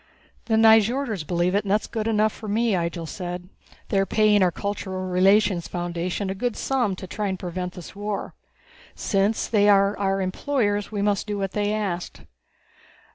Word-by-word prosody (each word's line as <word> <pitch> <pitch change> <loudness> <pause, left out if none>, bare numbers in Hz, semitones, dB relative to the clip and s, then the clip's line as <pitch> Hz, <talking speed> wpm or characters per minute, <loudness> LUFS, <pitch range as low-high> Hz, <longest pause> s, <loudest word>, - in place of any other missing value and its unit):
"The 225 - +1
Nyjorders 225 - +4
believe 175 +1 +1
it, 205 +1 +2
and 200 - -6
that's 210 +2 +2
good 220 -1 -3
enough 215 -1 +2
for 215 - -9
me," 225 +3 +1
Ihjel 170 -2 -2
said. 180 +1 -6 0.4
"They 195 - +2
are 195 - +2
paying 210 0 +4
our 185 - +5
Cultural 190 0 -4
Relationships 190 0 +3
Foundation 175 +2 -3
a - - -1
good 235 +4 -2
sum 245 -8 0
to 185 - -8
try 205 +3 -3
and 190 -1 -2
prevent 180 0 -5
this 180 +1 -10
war. 205 0 -4 0.6
Since 200 +2 0
they 210 -2 +3
are 200 0 +4
our 195 -1 +1
employers, 205 +1 -1
we 205 -2 -2
must 205 0 0
do 205 -1 -2
what 195 -1 -2
they 205 0 0
ask." 195 -5 -3
200 Hz, 180 wpm, -24 LUFS, 185-215 Hz, 0.6 s, our